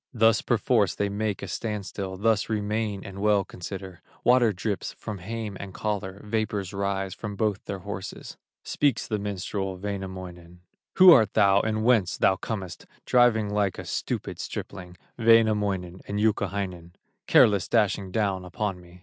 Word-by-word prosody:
Thus 115 -1 +4
perforce 115 -4 +2
they 100 0 -1
make 105 0 -2
a - - -4
stand 105 +1 -4
still, 95 -1 -5
Thus 110 +1 +1
remain 105 -1 -2
and 100 0 -8
well 105 -1 +3
consider; 95 0 -8 0.2
Water 120 -2 +5
drips 100 0 -3
from 105 -2 -7
hame 110 +2 -5
and 95 -1 -8
collar, 100 -2 -3
Vapors 105 -3 -2
rise 100 -1 -2
from 105 -2 -6
both 105 -1 -1
their 100 - -4
horses. 100 -1 -7 0.3
Speaks 140 -5 0
the 105 -2 -1
minstrel, 95 -1 -3
Wainamoinen: 95 -3 -7 0.3
"Who 185 -1 +9
art 110 - +5
thou, 100 -2 +5
and 110 +1 -1
whence? 110 -7 +3
Thou 95 - +3
comest 95 -3 -6 0.2
Driving 115 -4 +3
like 100 -3 0
a - - -7
stupid - - -4
stripling, 90 -3 -7 2.3
Careless, 100 -4 +5
dashing 100 -4 +1
down 100 -3 0
upon 90 +1 -3
me. 90 +1 -16
100 Hz, 140 wpm, -26 LUFS, 95-110 Hz, 2.3 s, Who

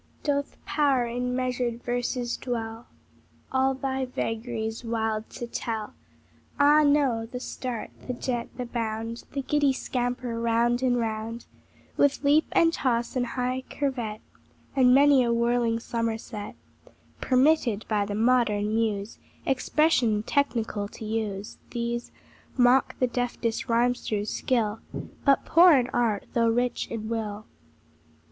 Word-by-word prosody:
Doth 285 -1 -1
power 275 -5 +2
in 250 +1 -2
measured 250 -2 -2
verses 245 0 -1
dwell, 230 -2 -5 0.6
All 265 0 +2
thy 265 0 -2
vagaries 225 -2 -3
wild 225 -1 -2
to 240 - -6
tell? 225 -2 -4 0.7
Ah, 295 +2 +6
no! 280 -6 +2
the 250 +2 -6
start, 250 -2 -5 0.2
the 250 - -2
jet, 240 -1 -3
the 250 - -3
bound, 230 -1 -4
The 275 -1 -2
giddy 290 0 +2
scamper 245 -2 -2
round 235 +1 +2
and 250 -2 +2
round, 225 0 -3 0.5
With 285 0 +2
leap 295 +3 +4
and 330 0 +4
toss 240 -4 0
and 245 -1 0
high 255 +1 -2
curvet, 240 -7 -3 0.5
And 255 -2 +5
many 280 0 +6
a 235 - +1
whirling 235 0 +2
somerset, 225 -2 -4 0.6
(Permitted 255 -5 +2
by 205 -2 0
the 205 - -3
modern 220 -2 +2
muse 220 -2 -1 0.3
Expression 260 -5 +2
technical 225 -6 0
to 215 - -9
use) 215 -2 -3
These 235 0 -3 0.5
mock 250 +1 +4
the 255 - +2
deftest 245 -1 -2
rhymester's 230 -3 +1
skill, 225 -4 0 0.5
But 275 -1 +4
poor 345 +1 +7
in 255 -3 +3
art, 230 -4 0
though 230 -1 +3
rich 245 +2 0
in 220 -1 -4
will. 215 -2 -3
240 Hz, 130 wpm, -26 LUFS, 225-260 Hz, 0.7 s, poor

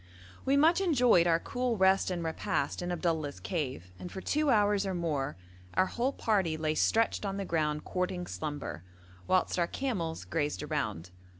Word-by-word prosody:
We 275 +1 +3
much 325 +6 +5
enjoyed 250 - +4
our 165 -1 +4
cool 245 +4 -2
rest 190 0 +4
and 175 -2 -2
repast 160 -2 -1
in 175 0 -3
Abdullah's 160 -4 -1
cave, 130 - -4
and 180 - -7
for 190 - -6
two 300 +8 +1
hours 205 -4 +3
or 190 -2 -2
more 150 - -2 0.4
our 185 - +4
whole 245 +7 -1
party 195 -11 0
lay 155 -1 0
stretched 225 +9 +2
on 195 -1 -2
the 200 - -3
ground 155 -3 -1
courting 180 -1 -2
slumber, 145 - -5 0.4
whilst 185 -1 +2
our 170 - +2
camels 185 -13 -3
grazed 150 -2 -2
around. 105 - -3
175 Hz, 170 wpm, -31 LUFS, 155-205 Hz, 0.4 s, much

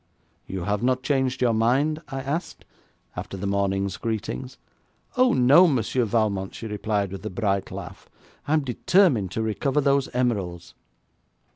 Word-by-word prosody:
'You 95 -2 -4
have 105 +2 -1
not 130 +1 +1
changed 130 -2 0
your 120 -2 +3
mind?' 135 +8 +1
I 135 -2 -5
asked, 145 +6 -4 0.5
after 95 - -6
the 100 - -5
morning's 100 -1 0
greetings. 120 +3 -4 0.6
'Oh, 255 0 +4
no, 140 +9 +6
Monsieur 125 -3 +1
Valmont,' 105 -4 -1
she - - -7
replied, 105 -2 -2
with 95 -1 -7
a - - -3
bright 100 -1 -1
laugh. - - -9 0.4
'I 150 - +1
am 155 - +3
determined 135 - +2
to 110 - -1
recover 130 +6 0
those 140 -1 +2
emeralds.' 100 -9 -2
115 Hz, 150 wpm, -24 LUFS, 100-135 Hz, 0.6 s, no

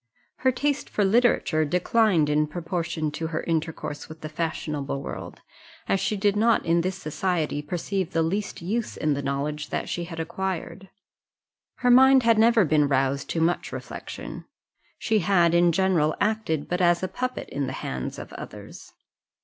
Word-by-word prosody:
Her 260 0 +2
taste 285 +2 -1
for 205 - +1
literature 200 -7 +3
declined 180 +1 +2
in 150 +1 +2
proportion 165 -1 -3
to 160 +2 -4
her 160 -1 -3
intercourse 160 -2 -3
with 155 0 -11
the 155 - -5
fashionable 150 -3 -3
world, 140 - -7 0.5
as 195 - +2
she 210 - -1
did 200 0 +2
not 225 +1 +3
in 170 0 +3
this 185 +2 -2
society 155 -1 -1
perceive 175 +4 -2
the 165 -2 +1
least 195 +2 -3
use 220 +6 -2
in 155 -1 +1
the 140 - -2
knowledge 140 +2 -3
that - - -3
she 175 - -3
had 165 -1 -8
acquired. 185 +2 -4 0.9
Her 245 - +2
mind 265 +1 +7
had 230 -1 +4
never 225 -2 +5
been 150 -1 +3
roused 135 0 0
to 165 - -1
much 170 +2 0
reflection; - - -7 0.5
she 220 -1 +1
had 175 -2 +3
in 170 0 +5
general 170 -3 +2
acted 205 -8 0
but 180 +1 -1
as 175 0 +3
a - - +1
puppet 255 +7 -4
in 140 -1 -2
the - - -4
hands 65 -1 -4
of - - -9
others. - - -10
170 Hz, 170 wpm, -25 LUFS, 155-200 Hz, 0.9 s, mind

